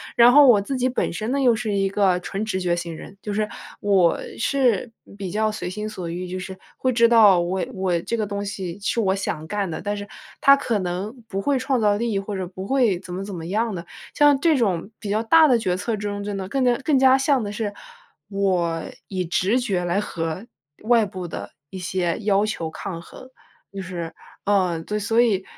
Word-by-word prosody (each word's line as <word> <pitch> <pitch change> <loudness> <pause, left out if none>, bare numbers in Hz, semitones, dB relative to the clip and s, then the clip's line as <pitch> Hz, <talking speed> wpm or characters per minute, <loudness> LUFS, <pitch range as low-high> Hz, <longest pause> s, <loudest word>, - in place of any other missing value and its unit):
然 240 +1 +7
后 290 +1 +8
我 225 -5 +7
自 270 +7 -3
己 255 +1 +1
本 250 - -1
身 215 +7 -3
呢 280 - +1
又 245 -3 +5
是 220 -3 -2
一 195 -1 +1
个 195 -3 +2
纯 195 +4 -4
直 190 -3 -2
觉 175 -1 +1
型 170 -1 -5
人， 195 +4 -11
就 210 - -4
是 215 +1 0 0.3
我 190 -4 +3 0.2
是 245 -3 +1 0.3
比 195 -2 -4
较 215 +1 +1
随 195 - -5
心 210 +3 -4
所 185 -5 -6
欲 180 +1 -5
就 185 +1 -4
是 190 0 -7 0.2
会 255 -1 0
知 235 0 +5
道 210 -6 +6
我 180 +2 -1
我 185 -3 0
这 235 - -2
个 220 - -1
东 200 0 -4
西 195 -2 -5
是 230 +3 0
我 190 -2 +2
想 175 -5 -3
干 200 0 -2
的。 160 - -5
但 205 0 -2
是 205 0 -6 0.3
它 275 0 +7
可 235 -6 -1
能 185 +5 -3
不 195 -2 -3
会 270 +4 +1
创 260 -3 0
造 205 -1 +3
利 235 +2 -1
益， - - +1
或 195 0 -5
者 185 - -3
不 185 +1 -8
会 240 -6 +2
怎 185 -2 -9
么 190 - -4
怎 195 -2 -6
么 165 -1 -6
样 215 +3 -1
的。 170 -1 -6 0.3
像 290 -2 +5
这 325 -1 +3
种 195 -5 0
比 205 - -7
较 215 +2 +1
大 315 +8 +6
的 240 -2 +4
决 180 -4 0
策 215 +4 -2
中， 205 0 -4
就 205 - -4
能 190 -1 -4
更 265 +6 0
加 245 -1 +4
更 295 -3 +3
加 265 0 +6
像 270 -3 +2
的 205 - -4
是 210 -1 -3 0.6
我 180 -5 0 0.3
以 185 -2 -2
直 195 +8 +1
觉 195 -8 -1
来 175 +3 0
和 165 0 -4 0.4
外 230 -1 +4
部 185 -3 -6
的 - - -7 0.2
一 190 - -8
些 180 -1 -1
要 205 0 +2
求 170 -7 -3
抗 170 +1 -6
衡。 255 +8 -13 0.4
就 195 - -5
是 170 -3 -6 0.3
嗯， 180 -5 +1
对， 210 0 -2
所 225 +3 +1
以 210 -6 +3
200 Hz, 245 characters per minute, -23 LUFS, 185-230 Hz, 0.6 s, 后